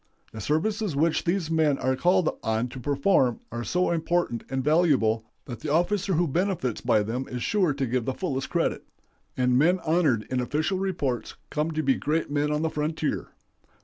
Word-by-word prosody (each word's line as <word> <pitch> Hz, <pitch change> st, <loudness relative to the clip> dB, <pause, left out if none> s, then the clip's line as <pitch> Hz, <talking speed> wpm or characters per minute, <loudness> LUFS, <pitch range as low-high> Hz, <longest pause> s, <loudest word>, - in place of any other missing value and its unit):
The 110 Hz, -, -8 dB
services 175 Hz, -, 0 dB
which 160 Hz, +3 st, +1 dB
these 170 Hz, -2 st, 0 dB
men 155 Hz, -3 st, +3 dB
are 130 Hz, 0 st, 0 dB
called 180 Hz, +4 st, +2 dB
on 110 Hz, +2 st, -1 dB
to 130 Hz, -, -8 dB
perform 140 Hz, -, +2 dB
are 120 Hz, +1 st, -4 dB
so 180 Hz, +8 st, +1 dB
important 170 Hz, -7 st, 0 dB
and 130 Hz, 0 st, -2 dB
valuable 140 Hz, -8 st, +3 dB, 0.2 s
that 120 Hz, -4 st, -7 dB
the 150 Hz, -, -5 dB
officer 190 Hz, +4 st, +1 dB
who 170 Hz, +2 st, +2 dB
benefits 170 Hz, -, -1 dB
by 115 Hz, -4 st, +3 dB
them 120 Hz, +5 st, -3 dB
is 125 Hz, -1 st, -4 dB
sure 190 Hz, -7 st, +2 dB
to 140 Hz, -1 st, -1 dB
give 125 Hz, -1 st, -1 dB
the 130 Hz, -, -1 dB
fullest 135 Hz, -8 st, -3 dB
credit, -, -, 0 dB, 0.5 s
and 125 Hz, 0 st, +3 dB
men 175 Hz, +6 st, +4 dB
honored 155 Hz, -10 st, +2 dB
in 130 Hz, -, +1 dB
official 155 Hz, +9 st, -1 dB
reports 155 Hz, -11 st, -2 dB, 0.2 s
come 150 Hz, +1 st, 0 dB
to 155 Hz, 0 st, -1 dB
be 135 Hz, -, +4 dB
great 155 Hz, +2 st, -1 dB
men 145 Hz, 0 st, +1 dB
on 150 Hz, +1 st, 0 dB
the 160 Hz, -, +1 dB
frontier. 155 Hz, +1 st, -2 dB
150 Hz, 185 wpm, -26 LUFS, 125-170 Hz, 0.5 s, men